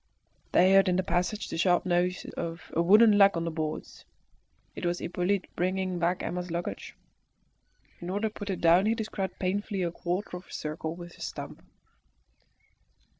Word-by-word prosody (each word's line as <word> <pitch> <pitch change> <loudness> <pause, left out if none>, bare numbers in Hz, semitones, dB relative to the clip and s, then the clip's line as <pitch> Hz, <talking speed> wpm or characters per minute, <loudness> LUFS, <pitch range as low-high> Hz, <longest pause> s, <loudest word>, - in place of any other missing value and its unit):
They 185 +2 +5
heard 195 -1 +6
in 180 - +2
the 185 - +1
passage 180 +4 -1
the - - -4
sharp 175 0 +3
noise 180 0 0
of 165 0 -6
a 165 - +3
wooden 210 +4 +6
leg 200 -3 +6
on 165 - -2
the 165 - -2
boards. 155 -1 -5 0.7
It - - -7
was 175 0 0
Hippolyte 180 +3 -1
bringing 185 0 -1
back 175 +1 0
Emma's 180 0 -3
luggage. 170 +1 -5 1.0
In 175 - -6
order 205 +4 0
to - - -22
put 205 -2 -7
it 190 - -3
down 175 +4 +5
he 225 - +2
described 215 -4 -4
painfully 195 +1 -1
a 170 - -1
quarter 180 +2 -3
of 180 - -13
a - - -16
circle 155 +1 -4
with 175 0 -10
his - - -7
stump. - - -7
180 Hz, 175 wpm, -28 LUFS, 175-195 Hz, 1.0 s, heard